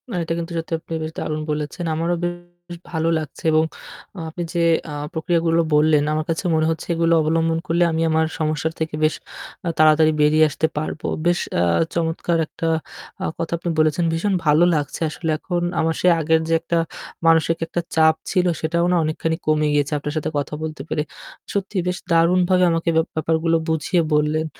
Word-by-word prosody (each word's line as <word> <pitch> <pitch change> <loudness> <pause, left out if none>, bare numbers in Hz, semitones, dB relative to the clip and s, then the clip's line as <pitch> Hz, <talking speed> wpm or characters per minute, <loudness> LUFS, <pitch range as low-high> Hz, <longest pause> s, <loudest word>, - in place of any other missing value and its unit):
না - - -6
এটা 165 - -2
কিন্তু 170 +1 -5
সত্যি 165 0 -4
আপনি 165 - -9
বেশ 155 - -4
দারুণ 155 0 -3
বলেছেন। 150 +3 -3
আমারও 165 +2 0
বে - - +2 0.5
শ - - -8 0.2
ভালো 160 0 +1
লাগছে 155 -3 -9
এবং 155 0 +4 0.7
আপনি 175 +2 -5
যে 175 - 0 0.3
আ - - -5 0.2
প্রক্রিয়াগুলো 165 0 +1
বললেন 150 -1 +4
আমার 155 0 -1
কাছে 165 +3 -2
মনে 155 0 +2
হচ্ছে 160 - -5
এগুলো 165 0 +2
অবলম্বন 165 +1 +1
করলে 170 +2 +2
আমি 160 0 -1
আমার 160 0 +2
সমস্যার 155 0 -1
থেকে 160 -1 -2
বেশ 155 - +3 0.5
আ - - +2
তাড়াতাড়ি 155 0 +5
বেরিয়ে 155 +1 +5
আসতে 155 +2 0
পারবো। 155 0 -4 0.2
বেশ 175 0 +3 0.2
আ - - +3 0.3
চমৎকার 170 0 0
একটা 165 - -4 0.6
আ - - 0
কথা 165 0 -3
আপনি 170 +1 -4
বলেছেন। 155 +2 +2
ভীষণ 195 +5 0
ভালো 150 +3 +5
লাগছে 145 +1 -3
আসলে 160 +1 -4
এখন 175 +2 -3 0.2
আমার 160 0 +1
সে - - +3
আগের 160 0 +2
যে - - +2
একটা 170 0 -1 0.5
মানসিক 165 0 +4
একটা 175 - -2
চাপ 160 0 +5 0.2
ছিল 180 -2 +2 0.2
সেটাও 170 +2 +1
না - - +3
অনেকখানি 155 +1 -1
কমে 155 0 +2
গিয়েছে 145 0 +1
আপনার 145 +1 -4
সাথে 155 - -1
কথা 145 +1 -3
বলতে 155 -3 -5
পেরে। 150 - 0 0.5
সত্যি 200 0 -2
বেশ 180 0 -1
দারুণভাবে 180 +2 +4
আমাকে 165 0 0
ব্যা 160 - +4
ব্যাপারগুলো 160 +1 +1
বুঝিয়ে 160 +2 +1
বললেন। 150 +1 +1
160 Hz, 185 wpm, -21 LUFS, 155-170 Hz, 0.7 s, তাড়াতাড়ি